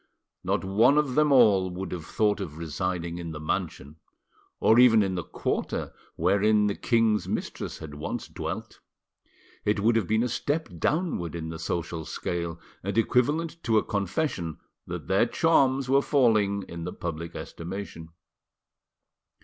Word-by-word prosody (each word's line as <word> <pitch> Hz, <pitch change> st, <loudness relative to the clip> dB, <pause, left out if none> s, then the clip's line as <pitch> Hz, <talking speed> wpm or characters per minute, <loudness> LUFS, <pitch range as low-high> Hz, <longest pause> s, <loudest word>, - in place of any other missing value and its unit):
Not -, -, 0 dB
one 115 Hz, +9 st, +4 dB
of 150 Hz, -4 st, +2 dB
them 150 Hz, +1 st, +3 dB
all 105 Hz, -8 st, +5 dB
would 90 Hz, +1 st, -5 dB
have 85 Hz, -3 st, -6 dB
thought 105 Hz, -1 st, +1 dB
of 75 Hz, 0 st, -6 dB
residing 85 Hz, +1 st, -3 dB
in 85 Hz, -2 st, -5 dB
the 75 Hz, -, -6 dB
mansion, 75 Hz, -1 st, -3 dB, 0.6 s
or 110 Hz, +2 st, +5 dB
even 115 Hz, -4 st, +7 dB
in 95 Hz, -1 st, -1 dB
the 90 Hz, -, -2 dB
quarter, -, -, -3 dB, 0.2 s
wherein 105 Hz, +5 st, +3 dB
the 100 Hz, -, +1 dB
king's 115 Hz, -3 st, +1 dB
mistress -, -, -4 dB
had 75 Hz, -2 st, -9 dB
once 75 Hz, -, -5 dB
dwelt. -, -, -6 dB, 0.8 s
It 105 Hz, 0 st, +1 dB
would 115 Hz, +3 st, +3 dB
have 110 Hz, -6 st, +1 dB
been 110 Hz, +2 st, +2 dB
a -, -, +1 dB
step 145 Hz, +5 st, -2 dB
downward 150 Hz, -, -1 dB
in 80 Hz, -1 st, -4 dB
the 80 Hz, 0 st, -6 dB
social 85 Hz, 0 st, -3 dB
scale, 85 Hz, 0 st, -4 dB, 0.2 s
and 100 Hz, +3 st, -3 dB
equivalent 150 Hz, +9 st, +1 dB
to 115 Hz, -2 st, +2 dB
a -, -, +3 dB
confession 100 Hz, -, -2 dB, 0.3 s
that -, -, -5 dB
their 95 Hz, +5 st, +3 dB
charms 135 Hz, -3 st, +3 dB
were 135 Hz, +2 st, +4 dB
falling 110 Hz, -9 st, +2 dB
in 85 Hz, -2 st, -7 dB
the 90 Hz, -, -4 dB
public 85 Hz, -1 st, -5 dB
estimation. 85 Hz, -2 st, -7 dB
100 Hz, 155 wpm, -27 LUFS, 85-120 Hz, 0.8 s, even